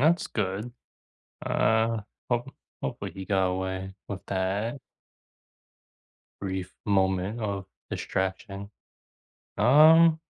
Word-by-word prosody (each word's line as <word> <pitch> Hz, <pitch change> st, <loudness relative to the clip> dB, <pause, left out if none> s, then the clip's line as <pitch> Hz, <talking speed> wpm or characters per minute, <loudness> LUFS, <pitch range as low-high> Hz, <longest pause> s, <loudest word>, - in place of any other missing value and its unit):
that's 165 Hz, +5 st, +3 dB
good. 105 Hz, +3 st, -2 dB, 0.7 s
Uh, 110 Hz, 0 st, +2 dB, 0.3 s
hope 120 Hz, +2 st, -1 dB, 0.3 s
hopefully -, -, -4 dB
he 95 Hz, -1 st, -7 dB
got 95 Hz, -1 st, +2 dB
away 95 Hz, +1 st, -3 dB
with 100 Hz, -2 st, -4 dB
that 100 Hz, +7 st, -1 dB, 1.6 s
brief 95 Hz, -1 st, -3 dB
moment 95 Hz, +2 st, +1 dB
of 100 Hz, -3 st, -3 dB, 0.2 s
distraction. 100 Hz, +1 st, -3 dB, 0.9 s
Um 155 Hz, +7 st, +7 dB
100 Hz, 85 wpm, -27 LUFS, 95-120 Hz, 1.6 s, Um